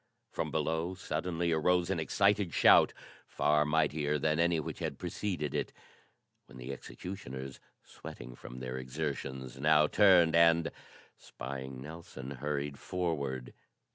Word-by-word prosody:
From - - -2
below 80 +4 -1
suddenly 85 -1 -2
arose 90 +3 +2
an 90 - 0
excited 100 +1 +2
shout - - +7 0.4
far 75 0 +2
mightier 75 -1 +1
than 75 +2 +1
any 85 -1 +3
which 75 - -5
had - - -3
preceded 90 -9 -3
it, - - -2 0.8
when 65 - -13
the 65 +2 -6
executioners, 65 -8 -7 0.2
sweating 60 0 -10
from - - -10
their 65 0 -4
exertions, 65 -1 -5
now 75 +1 +5
turned 90 -2 +5
and, 85 0 +5 0.5
spying 65 0 -7
Nelson, 75 -4 -9
hurried 70 +1 -3
forward. 70 -9 -3
75 Hz, 125 wpm, -32 LUFS, 65-85 Hz, 0.8 s, shout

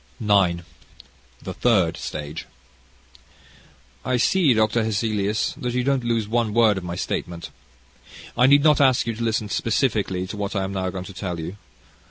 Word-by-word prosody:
CHAPTER 100 -5 +4
IX 85 0 -5 0.8
The - - -5
Third 95 -9 +2
Stage 75 +1 -6 1.6
"I 130 -1 0
see, 150 +1 +3
Dr. 110 +1 +2
Hesselius, 105 -1 -1
that 125 -5 -3
you 125 - +1
don't 135 -1 +1
lose 115 -3 0
one 115 -1 0
word 110 -4 +4
of - - -12
my 85 0 -5
statement. 85 -1 -4 0.8
I 125 +2 +5
need 140 +1 +6
not 150 -2 +5
ask 130 -3 +4
you 115 - -2
to 115 +2 -5
listen 110 -2 0
specially 105 -6 0
to 105 +3 -7
what 100 +1 -3
I 95 - 0
am 95 +1 -4
now 95 -1 -2
going 90 0 -6
to 100 - -10
tell 90 -2 -4
you. 85 +4 -6
110 Hz, 175 wpm, -23 LUFS, 95-120 Hz, 1.6 s, need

